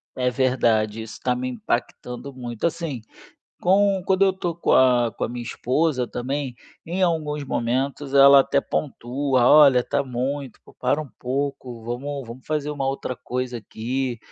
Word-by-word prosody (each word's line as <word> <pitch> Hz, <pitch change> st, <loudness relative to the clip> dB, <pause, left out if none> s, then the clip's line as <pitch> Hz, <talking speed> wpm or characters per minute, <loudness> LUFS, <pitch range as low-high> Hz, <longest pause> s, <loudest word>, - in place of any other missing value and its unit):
É 125 Hz, 0 st, +1 dB
verdade, 115 Hz, -4 st, +1 dB
isso 110 Hz, -, -10 dB
tá 125 Hz, -1 st, +1 dB
me 125 Hz, +1 st, -3 dB
impactando 125 Hz, +1 st, -4 dB
muito 120 Hz, -2 st, -5 dB
assim, 165 Hz, -6 st, -2 dB, 0.6 s
com 195 Hz, +1 st, +3 dB
quando 190 Hz, 0 st, +3 dB
eu 195 Hz, -, +4 dB
estou 175 Hz, -3 st, -4 dB
com 170 Hz, -, 0 dB
a 125 Hz, -3 st, +4 dB
com -, -, -3 dB
a -, -, -1 dB
minha 120 Hz, 0 st, -5 dB
esposa 130 Hz, +2 st, 0 dB
também, 130 Hz, +1 st, -3 dB, 0.3 s
em 180 Hz, +3 st, -3 dB
alguns 150 Hz, -4 st, 0 dB
momentos 135 Hz, +3 st, -2 dB
ela 140 Hz, 0 st, +8 dB
até 140 Hz, +1 st, +2 dB
pontua: 130 Hz, -2 st, 0 dB
"Olha, 140 Hz, -4 st, +7 dB
tá -, -, 0 dB
muito, 130 Hz, +1 st, -4 dB
pô, -, -, -18 dB
para 130 Hz, +4 st, 0 dB
um 150 Hz, -, -9 dB
pouco, 130 Hz, -2 st, -3 dB
vamos 135 Hz, +3 st, -5 dB
vamos 120 Hz, +3 st, -10 dB
fazer 150 Hz, -1 st, -1 dB
uma 140 Hz, -2 st, -2 dB
outra 135 Hz, -1 st, -3 dB
coisa 125 Hz, 0 st, -4 dB
aqui, 120 Hz, +3 st, -3 dB
130 Hz, 165 wpm, -23 LUFS, 125-145 Hz, 0.6 s, ela